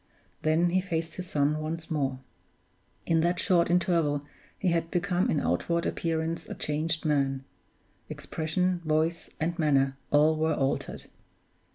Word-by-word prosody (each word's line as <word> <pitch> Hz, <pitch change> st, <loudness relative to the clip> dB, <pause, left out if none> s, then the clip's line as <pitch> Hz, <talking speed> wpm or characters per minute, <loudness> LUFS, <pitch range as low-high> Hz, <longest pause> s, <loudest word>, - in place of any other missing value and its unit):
Then 165 Hz, +3 st, +2 dB
he 185 Hz, +1 st, +3 dB
faced 165 Hz, -3 st, -3 dB
his 180 Hz, -1 st, -6 dB
son 150 Hz, +1 st, +1 dB
once 160 Hz, +1 st, -4 dB
more. 135 Hz, -4 st, -1 dB, 0.8 s
In 165 Hz, -1 st, +3 dB
that 175 Hz, +2 st, +1 dB
short 175 Hz, -3 st, +3 dB
interval 170 Hz, -5 st, +2 dB, 0.3 s
he 185 Hz, -, +1 dB
had 165 Hz, -1 st, 0 dB
become 180 Hz, +1 st, +1 dB
in 150 Hz, -, +2 dB
outward 170 Hz, -, 0 dB
appearance 165 Hz, 0 st, -2 dB
a -, -, -5 dB
changed 155 Hz, +2 st, -2 dB
man; 135 Hz, -3 st, +1 dB, 0.7 s
expression, 180 Hz, +3 st, -1 dB
voice, 160 Hz, +2 st, 0 dB
and 170 Hz, +2 st, -1 dB
manner, 135 Hz, -3 st, +2 dB
all 155 Hz, +2 st, +4 dB
were 160 Hz, 0 st, +1 dB
altered. 135 Hz, 0 st, -2 dB
160 Hz, 140 wpm, -28 LUFS, 150-170 Hz, 0.8 s, all